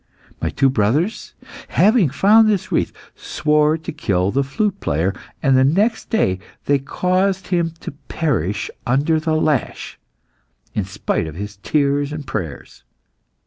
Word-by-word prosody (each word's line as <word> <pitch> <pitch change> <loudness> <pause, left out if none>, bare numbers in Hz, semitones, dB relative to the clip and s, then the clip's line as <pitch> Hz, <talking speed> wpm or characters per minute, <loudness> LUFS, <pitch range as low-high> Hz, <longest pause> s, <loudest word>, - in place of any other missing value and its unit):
My - - 0
two 135 -1 +2
brothers, 135 - 0 0.3
having 210 - +4
found 215 - +5
this 200 -4 -1
wreath, - - +1 0.2
swore 150 +1 +1
to 160 - -7
kill 95 - 0
the 140 +4 +1
flute 190 +9 -1
player, 85 +7 0 0.3
and 135 -1 +4
the 130 - +5
next 205 - +1
day 95 - +1 0.3
they 145 -1 +3
caused 185 +6 0
him 170 -3 0
to - - -6
perish 140 - -2 0.2
under 145 +6 +2
the 155 0 0
lash, 155 -4 -1 0.7
in 105 - -1
spite 95 -3 -2
of 80 - -8
his 105 +2 -6
tears 140 +5 0
and 150 -1 -6
prayers. 85 - -6
145 Hz, 145 wpm, -20 LUFS, 105-170 Hz, 0.7 s, found